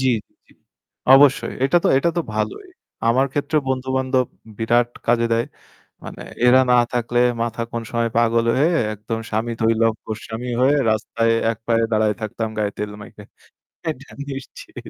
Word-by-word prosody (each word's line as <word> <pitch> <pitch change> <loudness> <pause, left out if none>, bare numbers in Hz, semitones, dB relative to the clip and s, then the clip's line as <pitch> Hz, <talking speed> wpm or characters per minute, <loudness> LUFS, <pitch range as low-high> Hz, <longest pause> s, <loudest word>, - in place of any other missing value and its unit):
জি, 130 - +1 0.2
জি, - - -38 0.2
জি। - - -22 0.6
অবশ্যই। 135 0 +5
এটা 135 +6 +3
তো - - +4
এটা 155 +5 +2
তো - - +2
ভালোই। 110 - -3 0.4
আমার 130 +4 +3
ক্ষেত্রেও 145 +2 0
বন্ধু-বান্ধব 130 0 0 0.3
বিরাট 120 +1 +2 0.2
কাজে 115 0 +3
দেয়। 115 +1 +2 0.6
মানে - - -9 0.2
এরা 125 +1 +7
না - - +6 0.2
থাকলে 120 0 0 0.2
মাথা 115 0 -4
কোন 115 - -3
সময় 115 -1 0
পাগল 115 0 +3
হয়ে 160 +5 +3 0.2
একদম 110 +2 -5
স্বামী 110 +2 -1
থৈ 115 0 +3
লম্পট 110 -1 -1
স্বামী 115 +3 -5
হয়ে 135 +3 +4 0.2
রাস্তায় 115 +1 0 0.2
এক 115 - -7
পায়ে 115 -1 +2
দাঁড়ায় 110 -1 +2
থাকতাম 110 +1 -3
গায়ে 105 -1 0
তেল 105 0 -4
মেখে। 105 0 -12 0.7
এটা 140 -3 -6 0.2
নিশ্চিত। 135 -1 -9
115 Hz, 160 wpm, -21 LUFS, 115-130 Hz, 0.7 s, এরা